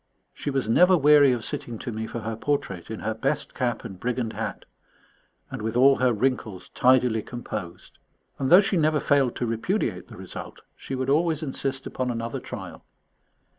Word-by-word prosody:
She - - -4
was 135 -4 -1
never 180 +11 +5
weary 145 -2 +6
of 120 -3 -1
sitting 120 -2 -5
to 120 - -6
me 110 0 -4
for 120 - -5
her 110 +1 -4
portrait, 110 -8 -2
in 110 - -6
her 110 - -1
best 140 +7 -1
cap 120 -4 -2
and 95 -5 -8
brigand 120 -1 -2
hat, - - -5 0.9
and - - -5
with 110 +2 -2
all 135 +2 +6
her 130 -1 +3
wrinkles 110 -6 -2
tidily 125 -3 +3
composed, 105 -7 -7 0.4
and 135 - 0
though 180 +3 +9
she 195 -1 0
never 155 -1 +2
failed 140 -5 +2
to 125 - -2
repudiate 115 -1 -2
the - - -12
result, - - -8
she 135 - -6
would 130 +1 -1
always 160 +1 +1
insist 135 -1 -3
upon 130 -1 -3
another 115 -1 -3
trial. - - -8
125 Hz, 180 wpm, -25 LUFS, 115-140 Hz, 0.9 s, though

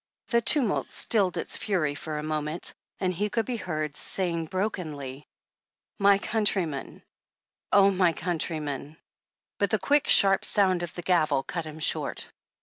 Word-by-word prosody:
The 235 -2 +3
tumult 235 -1 +3
stilled 200 -5 +2
its - - -1
fury 175 -8 -1
for 150 +1 -6
a 150 - -4
moment, 155 +1 -1 0.3
and 185 -1 0
he 205 +4 -2
could 225 +1 -1
be 250 -2 -3
heard 155 -6 -4
saying 170 -2 -2
brokenly: 155 -8 -4 0.7
''My 200 0 +5
countrymen, 195 -10 -1 0.7
oh, 200 -1 +6
my 185 -2 +3
countrymen 155 -4 -4 0.3
" - - -67
But - - +1
the - - +2
quick 290 0 +1
sharp 195 -1 +6
sound 190 -4 +2
of 175 -2 -5
the 175 - -6
gavel 155 -6 +2
cut 170 +2 -4
him 155 0 -8
short. 155 - 0
175 Hz, 150 wpm, -27 LUFS, 155-200 Hz, 0.7 s, oh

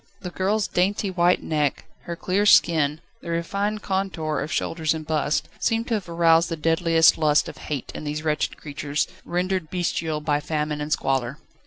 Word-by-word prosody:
The 180 - -6
girl's 200 +3 0
dainty 195 +2 0
white 175 0 +2
neck, 150 -3 -1 0.2
her 170 - -4
clear 195 +4 0
skin, 155 -5 +4 0.2
the - - -8
refined 200 +5 -2
contour 190 -5 -2
of 155 - -4
shoulders 160 -2 0
and 155 -1 -6
bust, 155 -1 0
seemed 225 0 0
to - - 0
have 200 -5 -2
aroused 165 0 +4
the 165 - -2
deadliest 165 +1 +4
lust 150 -1 +3
of - - -9
hate 145 -4 -5
in - - -7
these 150 +1 -4
wretched 155 -1 -1
creatures, 145 0 -3 0.2
rendered 180 -1 -2
bestial 165 -3 -1
by 150 -1 0
famine 150 -1 -2
and 150 +1 -4
squalor. 135 -2 0
165 Hz, 175 wpm, -24 LUFS, 150-180 Hz, 0.2 s, skin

